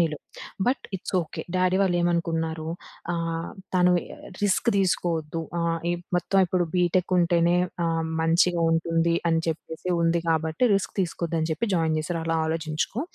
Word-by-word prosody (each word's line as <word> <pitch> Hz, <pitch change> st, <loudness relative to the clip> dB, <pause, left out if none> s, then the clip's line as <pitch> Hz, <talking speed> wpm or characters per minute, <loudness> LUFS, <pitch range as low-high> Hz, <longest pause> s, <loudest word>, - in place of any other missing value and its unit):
నీలో. 160 Hz, -3 st, +1 dB, 0.5 s
But 255 Hz, +2 st, +1 dB
it's 190 Hz, -, -7 dB
okay. 155 Hz, -, -7 dB
Daddy 185 Hz, 0 st, +2 dB
వాళ్ళు 180 Hz, -2 st, +1 dB
ఏమనుకున్నారు 165 Hz, -2 st, -1 dB, 0.5 s
ఆహ్, 165 Hz, -1 st, -2 dB, 0.2 s
తను 180 Hz, 0 st, +5 dB, 0.2 s
ఆహ్, -, -, -14 dB, 0.2 s
రిస్క్ 205 Hz, +2 st, +2 dB
తీసుకోవద్దు! 165 Hz, -4 st, 0 dB, 0.2 s
ఆహ్, 170 Hz, 0 st, 0 dB
ఈ -, -, +2 dB, 0.2 s
మొత్తం 195 Hz, +2 st, +1 dB
ఇప్పుడు 180 Hz, 0 st, +1 dB
బీటెక్ 180 Hz, +1 st, +1 dB
ఉంటేనే 170 Hz, 0 st, +3 dB, 0.3 s
ఆహ్, 165 Hz, -1 st, 0 dB, 0.2 s
మంచిగా 170 Hz, +1 st, +3 dB
ఉంటుంది 165 Hz, +1 st, +1 dB, 0.2 s
అని 165 Hz, 0 st, +2 dB
చెప్పేసి 160 Hz, +2 st, -5 dB
ఉంది. 165 Hz, 0 st, +2 dB
కాబట్టి, 160 Hz, +6 st, +1 dB
రిస్క్ 195 Hz, -, -1 dB
తీసుకోవద్దని 165 Hz, -2 st, -1 dB
జెప్పి 195 Hz, +9 st, -2 dB
జాయిన్ 160 Hz, -2 st, +1 dB
చేసారు 165 Hz, +2 st, -3 dB
అలా 165 Hz, 0 st, 0 dB
ఆలోచించుకో. 160 Hz, +6 st, -2 dB
170 Hz, 145 wpm, -25 LUFS, 165-180 Hz, 0.5 s, తను